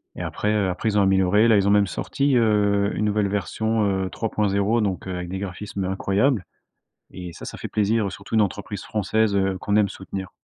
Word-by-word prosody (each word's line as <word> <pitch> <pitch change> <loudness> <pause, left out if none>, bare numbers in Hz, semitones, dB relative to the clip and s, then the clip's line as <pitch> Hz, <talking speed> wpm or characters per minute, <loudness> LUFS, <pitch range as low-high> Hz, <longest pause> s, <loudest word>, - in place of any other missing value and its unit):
Et - - -6
après, 105 - -2
heu, 105 -3 +1
après 90 +5 -1
ils 105 - 0
ont - - +5
amélioré. 95 +3 +4
Là 110 - +5
ils 100 0 +3
ont - - +4
même 105 0 +4
sorti, 140 +7 -1
heu, 105 -3 +2
une 105 - 0
nouvelle 105 -1 +1
version, 110 +2 -1
heu, 95 -1 0
3.0 105 +1 0
donc, 95 -2 -2
heu, 95 - -3
avec 90 -1 -5
des 95 - -4
graphismes 100 0 -5
incroyables 100 +4 +1 0.7
et 90 -2 -8
ça, - - -12
ça - - -7
fait - - -6
plaisir, 105 -1 0
surtout 105 - -6
une 110 - +5
entreprise 100 0 -3
française, 110 0 0
heu, 95 -1 +1
qu'on 100 +2 -1
aime 105 -2 +3
soutenir. 95 0 -7
100 Hz, 215 wpm, -23 LUFS, 95-105 Hz, 0.7 s, ont